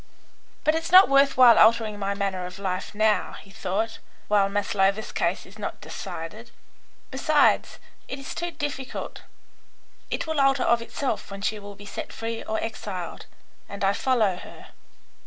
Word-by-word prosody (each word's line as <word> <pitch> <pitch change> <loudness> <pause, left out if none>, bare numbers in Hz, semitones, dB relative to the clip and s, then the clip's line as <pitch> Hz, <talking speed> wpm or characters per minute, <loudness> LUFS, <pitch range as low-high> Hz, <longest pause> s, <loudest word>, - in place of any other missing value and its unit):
"But 310 -1 +3
it's 325 +1 -2
not 375 +2 +9
worth 275 0 +4
while 245 -3 +8
altering 220 -2 +4
my 200 0 -1
manner 190 -3 -2
of 180 - -10
life 190 +1 -4
now," 215 -2 +2
he 195 - -12
thought, 220 +2 -3 0.3
"while 200 -1 +3
Maslova's 200 0 0
case 170 +2 -1
is 200 +3 -15
not 205 - -5
decided. 215 +9 -7 0.6
Besides, 290 +2 +2 0.3
it 265 - -5
is 275 - -7
too 345 0 -3
difficult. 290 -5 -5 0.9
It - - -2
will 315 -3 0
alter 275 -1 +3
of 235 0 +3
itself 235 0 -3
when 200 0 -8
she 210 +1 -1
will 205 0 -10
be 205 - -13
set - - -6
free 225 0 -5
or 220 - -2
exiled, 200 -6 -6 0.4
and 200 0 -6
I 195 +1 +3
follow 220 -7 +1
her." - - -12
215 Hz, 160 wpm, -25 LUFS, 200-265 Hz, 0.9 s, not